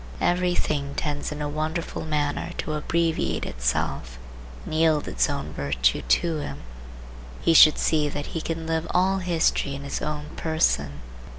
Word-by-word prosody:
Every 180 Hz, 0 st, +2 dB
thing 140 Hz, -4 st, -1 dB
tends 145 Hz, -1 st, -2 dB
in 150 Hz, 0 st, -4 dB
a -, -, -1 dB
wonderful 155 Hz, +3 st, -3 dB
manner 150 Hz, -2 st, -1 dB
to 155 Hz, -, -3 dB
abbreviate 165 Hz, +2 st, 0 dB
itself -, -, -2 dB, 0.5 s
and -, -, -6 dB
yield 155 Hz, -2 st, +3 dB
its -, -, +1 dB
own 140 Hz, -1 st, -4 dB
virtue 60 Hz, -4 st, +1 dB
to 165 Hz, -2 st, +1 dB
him. 75 Hz, -, -6 dB, 0.8 s
He 165 Hz, -, +3 dB
should 155 Hz, -1 st, +8 dB
see 150 Hz, -2 st, +2 dB
that 145 Hz, 0 st, -4 dB
he 165 Hz, -, -2 dB
can 165 Hz, 0 st, -4 dB
live 160 Hz, 0 st, -1 dB
all 190 Hz, +2 st, +3 dB
history 165 Hz, -5 st, +1 dB
in 140 Hz, -, -7 dB
his 140 Hz, -, -4 dB
own 150 Hz, 0 st, -4 dB
person. 75 Hz, -, 0 dB
150 Hz, 160 wpm, -25 LUFS, 140-165 Hz, 0.8 s, should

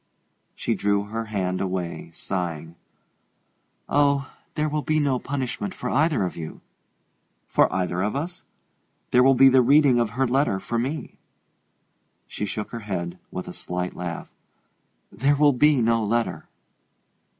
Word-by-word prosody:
She -, -, -1 dB
drew 100 Hz, 0 st, +1 dB
her 115 Hz, +2 st, -4 dB
hand 95 Hz, -4 st, -2 dB
away, 90 Hz, -3 st, -3 dB
sighing. 85 Hz, -2 st, -4 dB, 1.1 s
"Oh, 140 Hz, -1 st, +2 dB, 0.2 s
there 155 Hz, 0 st, +1 dB
will 150 Hz, 0 st, -1 dB
be 155 Hz, +1 st, +1 dB
no 140 Hz, -4 st, +1 dB
punishment 140 Hz, +9 st, -3 dB
for -, -, -4 dB
either 150 Hz, -, +2 dB
of 90 Hz, -, -4 dB
you." 80 Hz, -2 st, -7 dB, 0.9 s
"For -, -, +3 dB
either 90 Hz, -1 st, -1 dB
of 105 Hz, +4 st, -1 dB
us? 170 Hz, +6 st, -4 dB, 0.7 s
There 125 Hz, -, +6 dB
will 135 Hz, +1 st, +6 dB
be 135 Hz, +2 st, +7 dB
the 130 Hz, -1 st, +6 dB
reading 135 Hz, 0 st, +5 dB
of 115 Hz, 0 st, -1 dB
her 135 Hz, -, +3 dB
letter 130 Hz, -6 st, +1 dB
for 115 Hz, +4 st, -2 dB
me." 140 Hz, +6 st, -4 dB, 1.1 s
She 105 Hz, -, -4 dB
shook 105 Hz, +2 st, -4 dB
her 115 Hz, -, -5 dB
head 90 Hz, -4 st, -4 dB
with 90 Hz, -, -6 dB
a -, -, -7 dB
slight 90 Hz, 0 st, -4 dB
laugh. 85 Hz, -2 st, -5 dB, 0.8 s
"There 140 Hz, +5 st, +2 dB
will 145 Hz, 0 st, +5 dB
be 140 Hz, -1 st, +4 dB
no 115 Hz, 0 st, +2 dB
letter." 115 Hz, +2 st, -1 dB
115 Hz, 150 wpm, -24 LUFS, 95-140 Hz, 1.1 s, be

